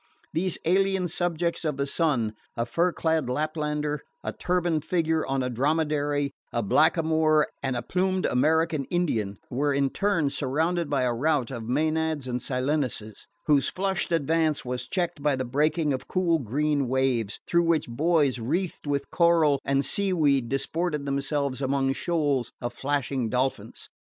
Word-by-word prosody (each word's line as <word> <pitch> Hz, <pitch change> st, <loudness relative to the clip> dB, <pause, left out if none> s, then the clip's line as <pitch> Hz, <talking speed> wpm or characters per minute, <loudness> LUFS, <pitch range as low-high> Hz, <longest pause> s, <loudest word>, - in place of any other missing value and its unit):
These 180 Hz, +2 st, -1 dB
alien 190 Hz, +1 st, +2 dB
subjects 170 Hz, 0 st, -1 dB
of 150 Hz, -4 st, -1 dB
the 140 Hz, -, 0 dB
sun 140 Hz, -8 st, 0 dB, 0.2 s
a 115 Hz, -, 0 dB
fur 170 Hz, +9 st, +1 dB
clad 160 Hz, -6 st, 0 dB
Laplander, 150 Hz, +1 st, -1 dB, 0.2 s
a -, -, -3 dB
turbaned 175 Hz, -4 st, 0 dB
figure 160 Hz, -2 st, +1 dB
on 135 Hz, -1 st, 0 dB
a 125 Hz, -, -1 dB
dromedary, 145 Hz, +1 st, 0 dB, 0.2 s
a 120 Hz, -, -1 dB
blackamoor 155 Hz, -, +3 dB, 0.2 s
and 135 Hz, -2 st, -1 dB
a 120 Hz, -, -3 dB
plumed 185 Hz, 0 st, 0 dB
American 155 Hz, +2 st, +2 dB
Indian 115 Hz, -, -1 dB
were 145 Hz, +4 st, +1 dB
in 140 Hz, -1 st, +1 dB
turn 170 Hz, -8 st, +1 dB
surrounded 160 Hz, +5 st, 0 dB
by 140 Hz, -3 st, +1 dB
a 125 Hz, -1 st, +1 dB
rout 140 Hz, 0 st, 0 dB
of 115 Hz, -3 st, -6 dB
Maenads 155 Hz, +1 st, 0 dB
and 125 Hz, -1 st, -3 dB
Silenuses, 125 Hz, -5 st, -2 dB, 0.2 s
whose 145 Hz, -4 st, +3 dB
flushed 190 Hz, -1 st, -1 dB
advance 160 Hz, -1 st, +1 dB
was 125 Hz, 0 st, -3 dB
checked 175 Hz, -2 st, -2 dB
by 145 Hz, -1 st, +2 dB
the 130 Hz, 0 st, -3 dB
breaking 150 Hz, +4 st, +1 dB
of 130 Hz, -, -5 dB
cool 175 Hz, -3 st, +1 dB
green 140 Hz, +3 st, 0 dB
waves, 125 Hz, -4 st, 0 dB
through 170 Hz, 0 st, +2 dB
which 165 Hz, -2 st, +2 dB
boys 145 Hz, +1 st, +1 dB
wreathed 160 Hz, +7 st, -2 dB
with 140 Hz, -1 st, -2 dB
coral 165 Hz, -5 st, +3 dB
and 140 Hz, 0 st, +1 dB
seaweed 150 Hz, -11 st, +1 dB
disported 150 Hz, +2 st, -1 dB
themselves 140 Hz, -1 st, -1 dB
among 135 Hz, 0 st, +1 dB
shoals 145 Hz, -7 st, 0 dB
of 120 Hz, 0 st, -4 dB
flashing 135 Hz, -2 st, -1 dB
dolphins. 130 Hz, +3 st, -2 dB
150 Hz, 150 wpm, -26 LUFS, 130-165 Hz, 0.2 s, blackamoor